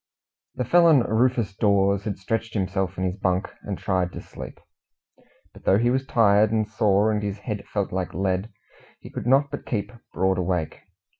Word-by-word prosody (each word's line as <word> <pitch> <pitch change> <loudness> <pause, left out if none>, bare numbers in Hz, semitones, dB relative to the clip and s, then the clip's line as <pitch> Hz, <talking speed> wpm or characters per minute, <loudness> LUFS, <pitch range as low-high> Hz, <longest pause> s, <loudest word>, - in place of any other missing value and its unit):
The 125 - -2
felon 165 0 +5
Rufus 115 -2 +1
Dawes 100 -1 +2
had 105 -3 -3
stretched 115 +4 -3
himself 95 -2 -1
in 95 - -2
his 95 +1 -2
bunk 95 -1 -1
and 100 -2 -5
tried 90 -2 -1
to - - -6
sleep. - - -10 0.9
But - - -16
though 95 - +4
he 120 +3 +2
was 130 +1 -1
tired 105 -2 +4
and 110 -1 +1
sore, 110 -1 +2
and 105 -1 -1
his 100 -1 -3
head 105 -1 -6
felt 100 -2 -2
like 90 -3 -3
lead, 95 +3 -1 0.5
he - - -12
could - - -5
not 140 +2 +3
but - - -5
keep 105 -4 -2 0.2
broad 95 +1 +1
awake. 90 -3 -2
100 Hz, 180 wpm, -24 LUFS, 95-115 Hz, 0.9 s, felon